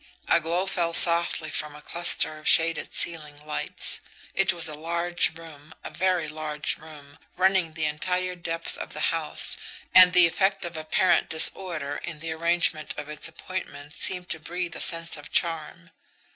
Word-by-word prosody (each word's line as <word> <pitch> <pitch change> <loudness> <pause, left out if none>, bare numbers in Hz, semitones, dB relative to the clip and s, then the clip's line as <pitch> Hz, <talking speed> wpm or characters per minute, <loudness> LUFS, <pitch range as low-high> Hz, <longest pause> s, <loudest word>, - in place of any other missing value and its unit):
A - - +4
glow 170 +3 -1
fell 170 -3 -1
softly 170 -2 +5
from 150 -1 -4
a 150 - -12
cluster 170 -2 0
of 155 - -8
shaded 165 0 +2
ceiling 150 -3 -2
lights. 150 - -2 0.3
It 195 0 +2
was 170 -2 -1
a 155 - -4
large 170 +2 -1
room, 160 -1 -14
a - - -8
very 180 -3 0
large 150 -1 -3
room, 150 -1 -14 0.2
running 185 -3 +2
the 160 -2 -1
entire 180 +5 -1
depth 165 -1 -4
of - - -7
the - - -7
house, - - +1 0.4
and 185 -1 +9
the 180 -1 +7
effect 190 +3 0
of 170 0 -7
apparent 165 +3 +1
disorder 160 -2 +2
in 170 -3 -7
the 165 +1 -6
arrangement 165 -1 0
of 150 0 -7
its 150 +1 +2
appointments 155 -4 -8
seemed 180 -1 +1
to 160 - -2
breathe 175 +2 -5
a - - -7
sense 165 -1 0
of 145 - -12
charm. 170 0 -1
165 Hz, 170 wpm, -25 LUFS, 155-175 Hz, 0.4 s, and